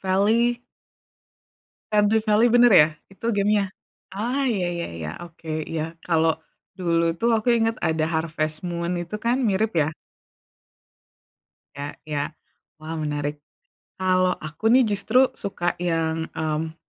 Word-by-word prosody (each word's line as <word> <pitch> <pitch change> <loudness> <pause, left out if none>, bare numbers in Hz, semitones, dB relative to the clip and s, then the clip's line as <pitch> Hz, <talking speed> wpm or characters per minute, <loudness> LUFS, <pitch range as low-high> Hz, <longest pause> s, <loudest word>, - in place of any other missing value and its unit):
Valley. 225 +6 +2 1.3
Stardew 210 +1 +4
Valley 215 +2 +4
bener 240 0 +6
ya? 155 -5 +8 0.2
Itu 230 - -7
game-nya? 205 0 +3 0.5
Ah 250 +7 -1
ya 195 -6 0
ya - - -3 0.2
ya. 75 - -4 0.2
Oke. 165 -1 -14 0.2
Iya. 160 -1 -2 0.2
Kalau 165 -1 +3 0.5
dulu 170 -2 +1 0.2
tuh 235 - +3
aku 220 +2 -2
inget 225 +1 +1
ada 160 -1 +1
Harvest 155 -1 -2
Moon 170 0 -2
itu 170 +4 -9
kan 235 +2 +2
mirip 210 +3 +1
ya? 155 +2 -2 1.8
Ya 145 +1 -6
ya. 145 -2 -1 0.5
Wah 155 +1 -6
menarik. 145 -1 -3 0.5
Kalau 185 -1 +2
aku 155 +7 -5
nih 260 - +7
justru 250 +6 +3
suka 185 -3 -2
yang, 165 -2 -1
mmm, 160 0 -2
180 Hz, 130 wpm, -24 LUFS, 160-220 Hz, 1.8 s, ya